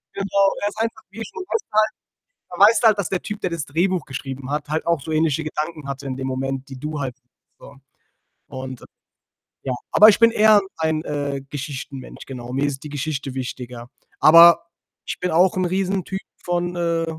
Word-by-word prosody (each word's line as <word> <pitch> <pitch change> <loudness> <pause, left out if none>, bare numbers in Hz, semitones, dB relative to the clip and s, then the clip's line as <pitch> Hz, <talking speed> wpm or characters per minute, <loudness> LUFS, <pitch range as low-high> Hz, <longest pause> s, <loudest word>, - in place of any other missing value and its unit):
Genau. 195 0 +2
Er 205 - +1
ist 210 - -14
einfach, 225 -1 -2
wie 225 +3 -7
schon 285 - -8
weißt 455 - 0
du - - -59 0.6
halt - - -60
da - - -9
weißt 220 +1 +4
du 225 - +8
halt, 210 -2 +4
dass 190 - -1
der 190 - -1
Typ, 210 0 -6
der 185 - -1
das 165 -3 -4
Drehbuch 175 +2 0
geschrieben 135 0 -6
hat, 150 0 -3
halt 155 +1 -1
auch 170 -4 +1
so 160 - -6
ähnliche 155 -1 +1
Gedanken 155 -1 -4
hatte, 140 0 -6
in 130 -1 -3
dem 130 0 -4
Moment, 135 +1 -3
die 135 -1 -9
du 150 0 -4
halt 130 -3 -4 0.4
so 140 - -14 0.7
und 130 -1 -7 0.8
ja, 130 - -2 0.2
aber 215 +1 +8
ich 205 - +4
bin 230 -1 +6
eher 215 -1 +6 0.2
ein, 160 -1 0
äh, 145 -2 -3
Geschichtenmensch, 135 -1 -7
genau. 125 -2 -8
Mir 135 +2 0
ist 140 -1 -3
die 150 - -7
Geschichte 140 -2 -4
wichtiger. 125 -2 -6 0.3
Aber, 170 +1 +8 0.4
ich - - -5
bin 180 - -1
auch 175 +3 +4
'n 185 -1 +1
Riesentyp 190 +1 -1 0.2
von, 175 0 -1
äh, 170 -1 0
155 Hz, 200 wpm, -22 LUFS, 135-185 Hz, 0.8 s, du